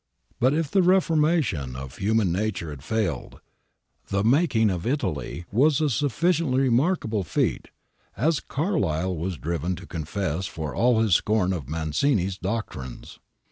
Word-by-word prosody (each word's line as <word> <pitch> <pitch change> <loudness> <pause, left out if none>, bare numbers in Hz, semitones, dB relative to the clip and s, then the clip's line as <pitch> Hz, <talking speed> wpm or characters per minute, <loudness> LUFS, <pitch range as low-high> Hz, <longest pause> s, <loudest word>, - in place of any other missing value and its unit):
But 130 +4 +3
if 155 -3 -1
the 195 - +4
reformation 160 - +2
of 65 0 -8
human 105 -2 +1
nature 95 -4 -2
had 70 -2 -9
failed, 105 -4 -2 0.7
the 100 0 0
making 115 - +3
of 90 +2 -3
Italy 90 - -2
was 140 +7 +3
a 155 -2 +1
sufficiently 145 - +1
remarkable 125 - +1
feat, 80 - -1 0.5
as 155 +4 +2
Carlyle 95 - -1
was 85 +2 -3
driven 85 +3 -2
to - - -10
confess 85 +2 -3
for 80 -6 -5
all 120 -1 +3
his 110 -4 +2
scorn 95 0 +2
of 75 -7 -5
Mazzini's 90 - 0
doctrines. 90 - -5
105 Hz, 140 wpm, -25 LUFS, 85-140 Hz, 0.7 s, the